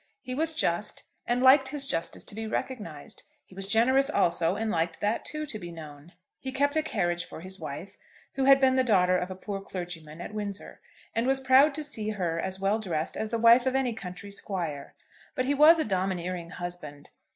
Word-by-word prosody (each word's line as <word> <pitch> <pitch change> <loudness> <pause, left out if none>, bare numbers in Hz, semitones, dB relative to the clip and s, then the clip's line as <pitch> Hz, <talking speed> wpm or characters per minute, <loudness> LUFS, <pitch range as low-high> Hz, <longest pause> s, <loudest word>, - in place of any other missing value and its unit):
He 255 - -4
was 320 +4 0
just, 325 - -1 0.2
and 245 +1 +1
liked 265 +1 +7
his 280 0 0
justice 165 -10 -2
to - - -3
be 220 +1 -5
recognised. 205 - -5 0.2
He - - -18
was 195 +1 -4
generous 260 +6 +3
also, 175 - +2
and 225 0 -1
liked 165 -1 -1
that, 210 +2 0
too, 305 0 -4
to 235 -8 -5
be 175 -3 -8
known. 155 0 -11 0.3
He 265 - -5
kept 285 +2 +1
a 315 - +3
carriage 175 - -1
for - - -10
his 190 +2 -8
wife, - - -7 0.4
who 270 - 0
had 275 0 +7
been 265 -1 +4
the 260 0 +3
daughter 185 -6 +3
of 180 0 -1
a 185 - -6
poor 195 +1 -5
clergyman 175 -5 -7
at 185 - -7
Windsor, 205 -2 -5 0.3
and 230 +2 0
was 270 0 +2
proud 265 +3 +5
to 310 - -3
see 220 -8 -4
her 175 -6 -2
as 190 +2 -4
well 200 +3 +1
dressed 165 -7 -3
as 220 - -3
the 230 - -1
wife 235 +2 +6
of 260 - +1
any 260 -3 +1
county 195 0 -8
squire. 170 -8 -4 0.4
But 255 - 0
he 280 - +2
was 305 +4 +7
a 315 - 0
domineering 185 -3 -2
husband. 165 -5 -8
205 Hz, 210 wpm, -28 LUFS, 175-260 Hz, 0.4 s, liked